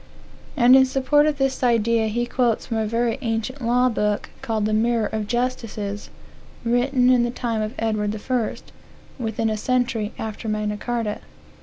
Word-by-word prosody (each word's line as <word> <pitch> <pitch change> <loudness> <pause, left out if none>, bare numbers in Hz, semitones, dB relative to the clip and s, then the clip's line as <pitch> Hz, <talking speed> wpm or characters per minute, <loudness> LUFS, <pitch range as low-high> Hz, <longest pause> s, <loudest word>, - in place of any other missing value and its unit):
And 250 0 +7
in 265 0 +6
support 275 +3 +3
of 300 -2 0
this 270 -1 0
idea 230 -2 +2
he 240 +3 -1
quotes 240 -2 0
from 225 - -3
a 220 -1 0
very 230 +2 0
ancient 230 +3 -3
law 245 +2 +3
book, 210 -3 -1
called 220 -2 -1
the 215 - 0
Mirror 230 0 +2
of 215 -1 -2
Justices, 225 -4 -3 0.6
written 250 +2 +3
in 250 -1 +4
the 240 - +1
time 235 -2 -2
of 215 +1 -4
Edward 215 -2 -1
I., 250 -4 0 0.7
within 225 -1 -1
a 215 - -1
century 240 -2 0
after 220 0 -5
Magna 210 0 -1
Carta. 230 -2 -2
230 Hz, 165 wpm, -23 LUFS, 215-250 Hz, 0.7 s, And